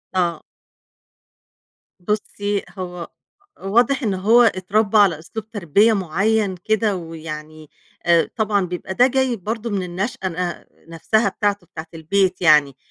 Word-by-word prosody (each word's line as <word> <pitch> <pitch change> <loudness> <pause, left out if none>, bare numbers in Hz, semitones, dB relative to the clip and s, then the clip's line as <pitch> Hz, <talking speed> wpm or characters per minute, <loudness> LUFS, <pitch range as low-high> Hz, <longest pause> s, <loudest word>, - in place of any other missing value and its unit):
آه. 175 -3 0 1.6
بُصّي، 205 +1 -2
هو 180 -2 -6 0.5
واضح 240 +7 +2
إن 210 -4 0
هو 215 +6 +4
إتربّى 210 0 +2
على 190 -7 +4
أسلوب 215 +7 -8
تربية 205 +2 +3
معيّن 195 +2 0
كده 220 -2 +1
ويعني، 155 -2 -8 0.4
آآ، 170 -1 +3
طبعًا 205 -3 +1
بيبقى 180 +1 -5
ده 245 +6 +5
جاي 260 -1 +1
برضه 225 +3 -4
من 200 -3 -2
النشأة 190 +3 -3
ن 175 0 -4 0.3
نفسها 215 +6 +1
بتاعته 200 -2 -2
بتاعة 160 0 -9
البيت 185 +3 0
يعني 150 -5 +5
195 Hz, 125 wpm, -21 LUFS, 170-215 Hz, 1.6 s, ده